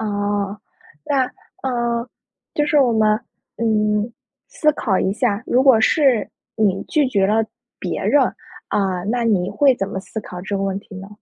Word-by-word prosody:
哦。 205 -1 -2 0.5
那， 270 -2 +2 0.4
呃， 240 -2 -1 0.5
就 295 - +2
是 300 - +3
我 250 -3 +3
们， 215 0 +3 0.4
嗯， 215 0 +1 0.4
思 305 -1 +2
考 205 -9 0
一 190 - +1
下， 215 -1 0
如 255 +2 +3
果 260 -5 +6
是 260 -2 +3 0.3
你 200 -3 +1
拒 295 -4 +1
绝 200 -6 +2
了 220 +2 +2 0.3
别 - - -3
人， 290 - +4 0.5
啊， 190 -3 0
那 235 +3 0
你 190 -5 +1
会 280 -3 +4
怎 195 -4 -3
么 195 - -4
思 220 +3 -6
考 180 -3 -8
这 195 +2 -3
个 195 - -2
问 195 0 -1
题 200 0 -14
呢？ 190 +1 -8
215 Hz, 180 characters per minute, -20 LUFS, 200-245 Hz, 0.5 s, 果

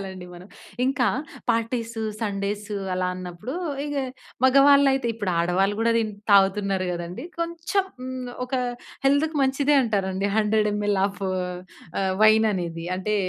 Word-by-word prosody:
ఒదిలేయాలండి 190 -2 -7
మనం. 180 +3 -12 0.4
ఇంకా 265 -2 +1 0.4
parties, 230 0 -1 0.3
Sundays 205 0 -2 0.3
అలా 185 0 0
అన్నప్పుడు 180 - -6 0.3
ఇగ 290 0 -4 0.5
మగవాళ్ళైతే 275 -1 +5
ఇప్పుడు 205 -4 -2
ఆడవాళ్ళు 185 +4 +1
గూడా 230 0 +3
తిన్ 215 -2 -1 0.2
తాగుతున్నారు 195 -1 +3
గదండీ? 175 - -5
కొంచెం 340 +3 -1 0.2
హ్మ్. 255 -1 -5 0.2
ఒక 255 - -15 0.5
హెల్త్‌కి 295 +3 +2
మంచిదే 275 +2 +2
అంటారండి. 195 -3 -1
100 215 0 +2
ఎంఎల్ 205 -1 0
ఆఫ్ 195 -1 -8 0.8
ఆహ్, 190 -1 +1
వైన్ 220 +1 +6
అనేది 170 -3 -4
అంటే 210 +3 -1
210 Hz, 125 wpm, -24 LUFS, 190-260 Hz, 0.8 s, వైన్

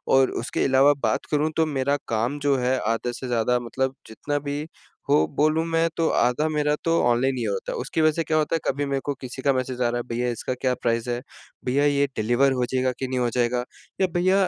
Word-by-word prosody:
और 135 -1 +4
उसके - - -1
अलावा 135 +2 +5
बात - - 0
करूँ 150 +1 +1
तो 160 - +4
मेरा 140 -1 0
काम 120 +6 -1
जो 140 -2 +2
है 130 +1 +1
आधा 115 +2 0
से 130 +1 -6
ज़्यादा 120 +1 +1
मतलब 130 +2 -2
जितना 145 +6 -3
भी 145 +1 -4 0.4
हो 75 - +5
बोलूँ 155 +2 +3
मैं 165 0 +2
तो 165 - +2
आधा 125 +6 +2
मेरा 150 -1 +1
तो 165 0 +3
ऑनलाइन 125 +2 +2
ही 120 - -2
होता 100 -3 -2
है, - - -4
उसकी 160 - -2
वज़ह 155 0 +5
से 165 - 0
क्या 155 - 0
होता 155 +1 +1
है 165 - 0
कभी 145 +2 -1
मेरे 140 -1 -1
को 145 - 0
किसी 130 0 -7
का 140 0 +3
मैसेज 130 -1 -3
आ 120 - +3
रहा 120 - -1
है 120 - -2
भैया 120 +1 -1
इसका 120 +2 -3
क्या 125 0 0
प्राइस 115 0 0
है? 120 0 -2 0.4
भैया 140 +3 +2
ये 140 -1 +3
डिलीवर 120 +5 +3
हो 125 -1 0
जाएगा 130 0 +2
कि 130 - -2
नहीं 130 0 -2
हो 120 -1 +1
जाएगा? 120 0 +1 0.4
या 190 - +4
भैया 185 +2 +3
130 Hz, 240 wpm, -24 LUFS, 120-145 Hz, 0.4 s, अलावा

